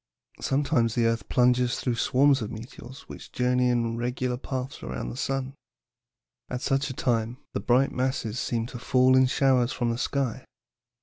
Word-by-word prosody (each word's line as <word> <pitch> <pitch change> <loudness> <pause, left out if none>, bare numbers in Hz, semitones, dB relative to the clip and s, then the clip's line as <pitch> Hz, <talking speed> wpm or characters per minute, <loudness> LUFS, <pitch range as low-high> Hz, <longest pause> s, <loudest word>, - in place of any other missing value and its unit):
"Sometimes 135 -5 +1
the 120 - +2
earth 115 0 -1
plunges 125 -1 +2
through 125 - -1
swarms 135 +3 +3
of 105 - -4
meteors, 120 +3 -10
which - - -11
journey 125 0 +1
in 115 -1 0
regular 125 +1 -2
paths 130 +2 -5
around 65 -1 -5
the - - -8
sun. 135 - -2 1.0
At 125 0 -4
such 135 +2 0
a - - -4
time, 115 -1 0 0.2
the - - -1
bright 125 +6 +2
masses 125 -3 -2
seem 115 -2 -1
to 120 - -6
fall 130 +1 +3
in 130 0 +5
showers 130 -2 +2
from 120 -2 -1
the 115 - -3
sky. 135 -4 -1
125 Hz, 170 wpm, -26 LUFS, 115-130 Hz, 1.0 s, in